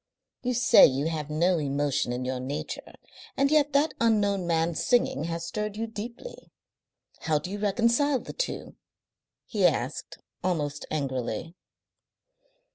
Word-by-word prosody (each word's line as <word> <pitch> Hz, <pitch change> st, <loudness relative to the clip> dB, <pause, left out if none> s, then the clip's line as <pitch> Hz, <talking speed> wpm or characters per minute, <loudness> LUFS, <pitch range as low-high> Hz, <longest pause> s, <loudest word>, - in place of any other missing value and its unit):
"You 250 Hz, 0 st, -1 dB
say 240 Hz, -, +7 dB
you 140 Hz, +3 st, -1 dB
have 155 Hz, -2 st, -4 dB
no 170 Hz, +3 st, +2 dB
emotion 145 Hz, -2 st, 0 dB
in 125 Hz, +1 st, -3 dB
your 130 Hz, 0 st, -2 dB
nature, 135 Hz, +3 st, -5 dB, 0.4 s
and 275 Hz, +1 st, +3 dB
yet 295 Hz, -1 st, +4 dB
that 290 Hz, +3 st, +3 dB
unknown 205 Hz, -5 st, +2 dB
man's 165 Hz, 0 st, 0 dB
singing 240 Hz, -, +2 dB
has 165 Hz, 0 st, -3 dB
stirred 210 Hz, +3 st, -4 dB
you 225 Hz, -, -1 dB
deeply. 230 Hz, -, -8 dB, 0.7 s
How 155 Hz, -2 st, +1 dB
do 150 Hz, +5 st, -5 dB
you 205 Hz, -, -4 dB
reconcile 235 Hz, +7 st, +2 dB
the -, -, -8 dB
two?" -, -, -4 dB, 0.7 s
he -, -, -2 dB
asked, -, -, 0 dB, 0.3 s
almost 150 Hz, -5 st, -2 dB
angrily. 130 Hz, -1 st, -3 dB
170 Hz, 135 wpm, -27 LUFS, 145-230 Hz, 0.7 s, say